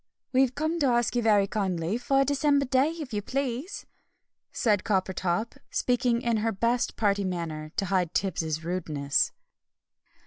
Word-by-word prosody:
"We've 260 -1 +3
come 315 +3 -1
to 285 - +3
ask 240 -1 +1
you 240 - +2
very 210 -3 +4
kindly 190 0 -1
for 270 +2 +2
a - - +3
December 285 0 +2
day, 265 +3 +3
if 315 -7 -7
you 205 - -1
please," 270 - -3 0.7
said 210 -5 +1
Coppertop, 190 0 -1
speaking 245 -1 +1
in 235 -1 +1
her 225 +1 0
best 235 +4 0
party 200 -2 +1
manner, 165 -4 -4
to 200 - 0
hide 180 -3 0
Tibbs' 160 -4 -1
rudeness. 155 -5 0
220 Hz, 150 wpm, -27 LUFS, 185-255 Hz, 0.7 s, very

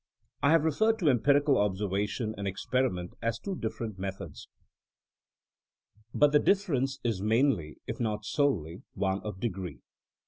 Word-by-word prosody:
I 140 - +4
have 160 -1 +5
referred 220 +9 +2
to 165 -9 +3
empirical 140 +3 +3
observation 105 +3 -1
and 100 -1 -4
ex 95 - -5
periment 120 -9 0
as 115 0 -1
two 195 +10 -4
different 110 - -4
methods. 95 -4 -6 1.6
But 145 +4 +4
the 150 - +5
difference 140 -11 +1
is 115 -6 -1
mainly, 110 - +1
if - - -5
not 105 -2 -2
solely, 100 - 0
one 95 0 0
of 105 -3 -6
degree. 95 - -4
110 Hz, 140 wpm, -29 LUFS, 95-140 Hz, 1.6 s, have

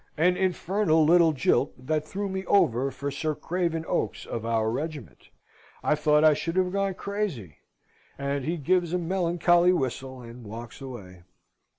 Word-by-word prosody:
An 180 +4 +3
infernal 185 -3 +1
little 170 0 +5
jilt 135 -1 +1
that 150 +4 -1
threw 200 +6 -4
me 190 0 -4
over 135 - +3
for 140 +1 -5
Sir 155 +2 -2
Craven 165 +1 -2
Oaks - - -2
of 115 -1 -5
our 110 -1 +1
regiment. 145 0 -6 0.5
I - - +3
thought 150 0 +3
I 155 -1 +7
should 165 +3 -3
have 185 -1 +1
gone 195 -1 -1
crazy." 190 - -4 0.6
And 140 0 -2
he 165 +5 -2
gives 175 +2 +1
a - - +2
melancholy 175 0 +2
whistle, 130 -3 -3
and 120 +1 -11
walks 115 +4 -9
away. 100 -9 -9
155 Hz, 160 wpm, -26 LUFS, 130-180 Hz, 0.6 s, I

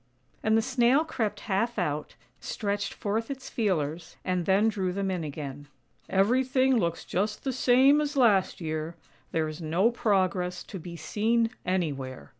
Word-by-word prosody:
And 220 0 +3
the 225 - +2
Snail 260 +4 +3
crept 225 -9 -2
half 230 +4 -1
out, 150 -5 -2 0.2
stretched 200 -2 -2
forth 220 +2 -2
its 270 -1 -6
feelers, 165 -6 -1
and 180 -2 -1
then 195 +3 +4
drew 195 -4 0
them 195 +1 -1
in 180 -3 -2
again. 145 -1 -6 0.2
" - - -36
Everything 260 +3 +2
looks 170 -7 -1
just 210 +3 -2
the 265 - -1
same 260 +4 +5
as 295 -1 -2
last 210 -7 +3
year; 155 0 -3 0.4
there 160 -1 0
is 155 +2 -7
no 170 +8 +2
progress 185 -5 0
to 195 - -8
be 170 +1 -8
seen 225 +7 +1 0.2
anywhere. 140 -8 -2
195 Hz, 160 wpm, -28 LUFS, 170-235 Hz, 0.4 s, same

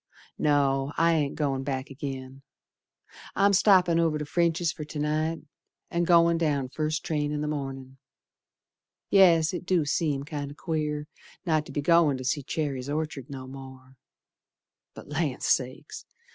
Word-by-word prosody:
No, 140 -2 +2
I 165 0 +4
ain't 150 -3 0
goin' 140 -3 -1
back 135 0 -4
agin. 135 -1 -7 0.9
I'm 200 0 +4
stoppin' 180 -4 +5
over 165 -2 +2
to 150 - -4
French's 170 +1 +1
fer 155 - -7
to 150 +1 -8
night, 155 +2 -1 0.5
And 170 0 0
goin' 170 -1 +5
down 145 -5 0
first 155 +1 -2
train 150 -2 -1
in 150 0 -2
th' - - -2
mornin'. 135 -3 -5 1.1
Yes, 170 -4 +5
it 180 - -4
do 180 -4 +1
seem 145 -2 0
kinder 145 -2 -6
queer 150 -2 -2 0.4
Not 155 -3 +1
to - - -9
be 145 - -2
goin' 165 -3 +4
to 130 - -7
see 145 +3 0
Cherry's 140 -2 -3
Orchard 150 -3 -3
no 135 -2 -7
more, 130 0 -11 1.0
But - - -11
Land 150 -3 -2
Sakes! 130 0 -1
150 Hz, 150 wpm, -27 LUFS, 135-165 Hz, 1.1 s, stoppin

